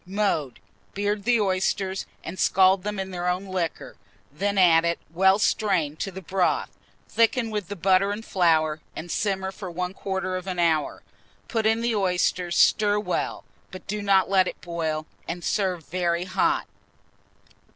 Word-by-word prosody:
Mode. 185 Hz, -, -1 dB, 0.4 s
Beard 205 Hz, 0 st, -1 dB
the 240 Hz, -1 st, +3 dB
oysters, 190 Hz, -1 st, -1 dB, 0.2 s
and 190 Hz, -, -7 dB
scald 190 Hz, 0 st, +4 dB
them 210 Hz, +1 st, -4 dB
in 190 Hz, 0 st, -4 dB
their 175 Hz, -1 st, -3 dB
own 180 Hz, +2 st, -1 dB
liquor; 185 Hz, -4 st, -4 dB, 0.4 s
then 200 Hz, +6 st, -1 dB
add 165 Hz, -3 st, +6 dB
it, 170 Hz, 0 st, 0 dB, 0.2 s
well 190 Hz, +3 st, +4 dB
strained, 185 Hz, -8 st, 0 dB
to -, -, -2 dB
the 190 Hz, +1 st, -9 dB
broth; 185 Hz, +2 st, 0 dB, 0.4 s
thicken 230 Hz, 0 st, +1 dB
with 210 Hz, -4 st, -3 dB
the 205 Hz, -, -5 dB
butter 190 Hz, +2 st, +3 dB
and 215 Hz, +2 st, -5 dB
flour, 160 Hz, -4 st, +2 dB
and 170 Hz, +1 st, -6 dB
simmer 190 Hz, -2 st, -1 dB
for 190 Hz, -2 st, -8 dB
1/4 185 Hz, +1 st, -3 dB
of 185 Hz, -, -13 dB
an 185 Hz, -1 st, -3 dB
hour. 165 Hz, -3 st, +1 dB, 0.4 s
Put 225 Hz, -2 st, 0 dB
in 225 Hz, +1 st, +2 dB
the 235 Hz, 0 st, 0 dB
oysters, 180 Hz, -2 st, 0 dB
stir 210 Hz, -1 st, +4 dB
well, 210 Hz, -, -2 dB, 0.3 s
but 185 Hz, -, -10 dB
do 210 Hz, +1 st, -3 dB
not 195 Hz, -2 st, +3 dB
let 190 Hz, -1 st, +3 dB
it -, -, -6 dB
boil, 160 Hz, -3 st, -3 dB, 0.2 s
and 175 Hz, +1 st, -5 dB
serve 185 Hz, -6 st, -1 dB
very 175 Hz, 0 st, -1 dB
hot. 330 Hz, -, +1 dB
190 Hz, 160 wpm, -25 LUFS, 175-205 Hz, 0.4 s, add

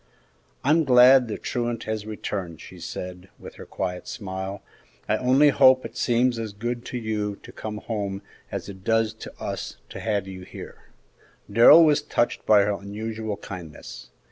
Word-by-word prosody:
"I'm 155 Hz, +4 st, +4 dB
glad 125 Hz, -1 st, +7 dB
the 105 Hz, -, -4 dB
truant 120 Hz, -2 st, -3 dB
has 110 Hz, -1 st, -4 dB
returned," 95 Hz, -6 st, -5 dB
she 90 Hz, -, -12 dB
said, 90 Hz, +2 st, -7 dB
with -, -, -11 dB
her -, -, -10 dB
quiet 90 Hz, -1 st, -4 dB
smile; 95 Hz, -1 st, -6 dB, 0.4 s
"I 110 Hz, -, +2 dB
only 130 Hz, +5 st, +4 dB
hope 130 Hz, -2 st, +5 dB
it -, -, -8 dB
seems 120 Hz, 0 st, +1 dB
as 110 Hz, -2 st, -5 dB
good 120 Hz, +3 st, -4 dB
to 125 Hz, -, -5 dB
you 105 Hz, -3 st, -2 dB
to -, -, -11 dB
come 105 Hz, -1 st, -6 dB
home 100 Hz, -3 st, -4 dB, 0.3 s
as -, -, -5 dB
it 95 Hz, -2 st, -10 dB
does 115 Hz, 0 st, +1 dB
to 110 Hz, -, -10 dB
us -, -, -5 dB
to -, -, -8 dB
have 105 Hz, -3 st, -1 dB
you 95 Hz, -1 st, -8 dB
here!" 90 Hz, -, -11 dB, 0.7 s
Darrell 145 Hz, +10 st, +8 dB
was 150 Hz, -1 st, +3 dB
touched 120 Hz, -4 st, -1 dB
by 105 Hz, -2 st, +7 dB
her 105 Hz, -, +1 dB
unusual 110 Hz, +1 st, -5 dB
kindness. 80 Hz, -10 st, -9 dB
110 Hz, 170 wpm, -24 LUFS, 100-120 Hz, 0.7 s, Darrell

